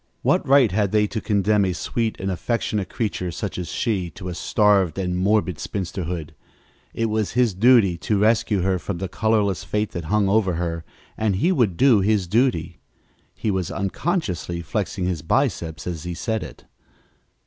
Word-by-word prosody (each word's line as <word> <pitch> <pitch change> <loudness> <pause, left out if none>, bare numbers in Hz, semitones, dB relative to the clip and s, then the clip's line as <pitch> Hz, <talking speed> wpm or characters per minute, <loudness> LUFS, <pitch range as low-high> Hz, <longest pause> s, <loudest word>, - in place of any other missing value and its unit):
What - - +3
right 135 -4 +5
had 100 0 +1
they 105 0 +3
to 110 +1 -4
condemn 105 0 +2
a 95 -2 0
sweet 115 +5 -2
and 95 0 -2
affectionate 105 0 -2
creature 105 -6 -2
such 85 - -4
as 90 - -4
she 95 -6 -1
to 90 -2 -6
a - - -4
starved 100 -2 +2
and 90 -2 -1
morbid 95 -2 +1
spinsterhood? 85 -4 -4 0.6
It 115 - -1
was 110 -4 -1
his 125 -4 +2
duty 100 -4 +4
to 105 - 0
rescue 105 -1 +2
her 95 -1 +1
from 95 +1 -4
the 95 +2 -3
colorless 105 -1 0
fate 105 0 -2
that 85 -2 -5
hung 100 +4 +2
over 100 -2 +2
her, 85 -1 -3 0.3
and 110 -3 +1
he 170 - +2
would 115 - +1
do 130 -5 +5
his 100 -1 +2
duty. 110 -3 0 0.6
He 110 - -1
was 95 -3 -1
unconsciously 95 - -2
flexing 90 +3 -2
his 90 -3 -2
biceps 80 - -1
as 85 -3 -4
he 90 -1 -5
said 110 +5 -2
it. - - -10
100 Hz, 175 wpm, -23 LUFS, 90-110 Hz, 0.6 s, right